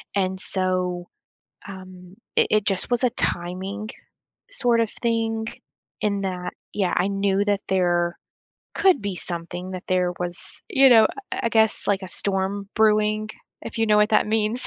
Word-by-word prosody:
and 190 -1 0
so, 185 -2 -1 0.6
um, 185 -1 -11 0.2
i - - +6
it 215 -1 +2
just 195 +2 +1
was 245 +1 +2
a 250 - +4
timing 190 +5 -3 0.6
sort 240 - +2
of 225 - 0
thing 225 -1 -1 0.6
in 200 -1 0
that 180 -2 -4 0.2
Yeah, 195 -3 0
I 180 +2 +2
knew 195 0 +1
that 205 -1 +1
there 175 -2 +1 0.6
could 380 -8 +4
be 200 -2 -3
something 175 +1 -5
that 185 -1 -6
there 180 -1 +1
was, 175 0 -4
you 270 0 +6
know, 220 -2 +8 0.3
I 380 - -2
I - - +3
guess, 220 -1 +2
like 200 -1 +1
a 185 - -6
storm 195 +2 -1
brewing, 215 0 +2 0.3
if - - -7
you 225 - +2
know 210 -1 +4
what 210 +1 +3
that 215 - +4
means. 220 +3 0
200 Hz, 165 wpm, -23 LUFS, 185-215 Hz, 0.6 s, know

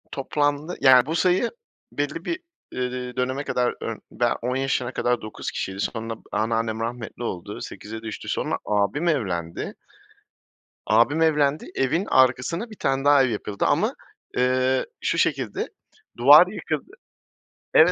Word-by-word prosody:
Toplamda 145 +3 -1
yani, 130 -2 +7
bu 160 +3 -2
sayı 185 +6 +2 0.4
belli 145 +3 -3
bir, 335 - -2 0.3
eee, 125 -1 -4
döneme 130 +2 -1
kadar, 125 -3 0
ımm, - - -4
ben - - +1
10 125 +2 -1
yaşına 130 -2 -1
kadar 120 0 0
9 110 - -6
kişiydi. 95 0 -4
Sonra 115 +2 -3 0.2
anneannem 115 0 0
rahmetli 115 +1 -5
oldu, 90 -7 -5
8'e 110 +2 -7
düştü. 110 -1 -6
Sonra - - -1
abim 105 +11 0
evlendi 90 - -2 1.1
abim 120 +9 +3
evlendi, 150 -1 +2
evin 160 +9 +1
arkasına 130 - +2
1 215 - -10
tane 135 +1 0
daha 145 -1 +6
ev 130 - +1
yapıldı 105 -2 -2
ama, - - +1 0.4
eee, 130 +1 +2 0.2
şu - - 0
şekilde, 135 -10 0 0.5
duvar 145 +8 +8
yıkıldı 160 -6 -4 0.8
Evet, 165 +3 +7
130 Hz, 135 wpm, -24 LUFS, 115-145 Hz, 1.1 s, duvar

